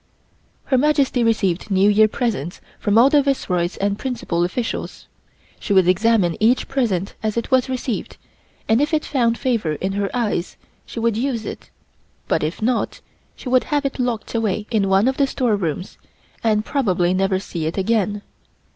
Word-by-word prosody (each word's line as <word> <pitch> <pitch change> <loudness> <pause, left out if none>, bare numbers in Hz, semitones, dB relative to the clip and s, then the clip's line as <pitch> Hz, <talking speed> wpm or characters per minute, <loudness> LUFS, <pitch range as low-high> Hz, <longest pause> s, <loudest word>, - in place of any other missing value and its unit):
Her 260 -2 +1
Majesty 280 -4 +2
received 215 -5 0
New 195 0 +3
Year 210 +1 +5
presents 210 - -3 0.2
from 205 0 +1
all 255 +4 +6
the 295 - +5
Viceroys 185 -11 -1
and 200 +1 -1
principal 240 -10 -2
officials. 225 +7 -4 0.5
She 205 - -2
would 190 -2 +5
examine 190 -2 +3
each 230 +4 +2
present 215 -9 -1
as 215 0 -2
it 235 - -3
was 260 0 +3
received, 255 -2 -3 0.5
and 225 +4 +3
if 300 +2 +1
it 305 - -1
found 235 -4 +1
favor 230 - 0
in 190 +6 -3
her 200 0 -1
eyes, 215 -7 -2 0.3
she - - -6
would 230 -1 +1
use 240 -2 -2
it, - - -8 0.6
but - - +1
if 155 +7 -3
not, 245 +2 0 0.4
she - - -10
would 255 0 +3
have 290 -1 -1
it 275 - -3
locked 245 -3 -2
away 215 -3 -1
in 205 -4 +1
one 195 +4 +4
of 265 - 0
the 280 - +3
storerooms 200 - -2 0.4
and 215 -1 +2
probably 185 -10 +1
never 190 0 +1
see 170 -4 -4
it 165 - -4
again. 205 0 0
220 Hz, 175 wpm, -21 LUFS, 195-250 Hz, 0.6 s, all